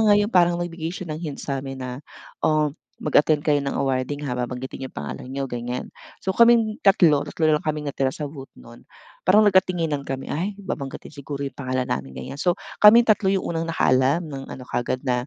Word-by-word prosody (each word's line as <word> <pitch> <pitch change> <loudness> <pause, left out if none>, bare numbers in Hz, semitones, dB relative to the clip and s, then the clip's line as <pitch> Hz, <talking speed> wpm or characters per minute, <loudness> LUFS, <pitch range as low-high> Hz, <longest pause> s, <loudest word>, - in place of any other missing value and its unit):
nga 205 - +7
yung 205 +2 +1
parang 175 -1 +4
nagbigay 170 -2 -4
siya 180 -3 -6
ng 155 - -6
hint 155 -5 -5
sa'min 135 -1 -4
na 125 0 -5 0.4
"Oh, 155 -2 +2 0.3
mag-attend 150 0 +3
kayo 145 -2 +3
ng 140 -1 -3
awarding, 135 +2 -1
ha, 135 - -2
babanggitin 125 +2 -5
yung - - -39
pangalan - - -6
niyo." 135 +1 -3
Ganiyan. 120 0 -4 0.4
So 190 - +1
kaming 230 -2 +5
tatlo 170 -7 +5
tatlo 160 - -2
na 155 - +5
lang - - -20
kaming 150 -1 -2
natira 135 -1 0
sa 150 - -5
booth 140 -2 -10
nun 115 0 -15 0.4
parang 205 +4 +6
nagkatinginan 175 -7 +2
kami, 135 0 -5
"Ay, 185 +7 -2
babanggitin 140 -8 -6
siguro 140 0 -6
yung 140 - -5
pangalan 130 -1 -1
namin 65 -1 -3
ganiyan." 135 - -7
So, 175 +3 +2 0.3
kaming 220 +3 +9
3 215 -2 +3
yung 195 -1 +1
unang 165 0 -1
nakaalam 135 +1 +2
ng 135 -3 -7
ano 130 - -8
kaagad 125 +1 -2
na 125 -1 0
145 Hz, 200 wpm, -23 LUFS, 130-175 Hz, 0.4 s, kaming